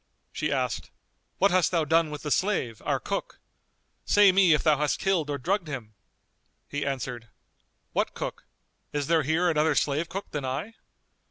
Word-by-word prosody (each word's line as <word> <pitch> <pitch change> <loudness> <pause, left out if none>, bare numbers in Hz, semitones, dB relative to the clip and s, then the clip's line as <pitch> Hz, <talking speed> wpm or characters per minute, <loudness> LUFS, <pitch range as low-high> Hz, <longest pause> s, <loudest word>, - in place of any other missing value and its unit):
She - - -2
asked, - - -1 0.5
"What 200 - +4
hast 185 -1 +3
thou 165 -3 +1
done 165 +1 +3
with 150 -1 -7
the 150 - -3
slave, 135 - 0
our - - 0
cook?; - - -4 0.6
say 205 -2 +6
me 185 -2 +5
if - - -2
thou 155 -2 +4
hast 150 -1 +1
killed 180 -6 0
or 145 - -1
drugged 180 +6 -1
him?" 120 -7 -6 0.7
He 145 0 -3
answered, 125 -4 -4 0.7
"What - - 0
cook? - - -5 0.5
Is 145 -1 -1
there 165 +1 +3
here 160 +5 +1
another 160 -1 +2
slave 150 +4 0
cook 195 +3 -6
than 145 -2 -3
I?" 135 - -3
155 Hz, 170 wpm, -27 LUFS, 140-180 Hz, 0.7 s, say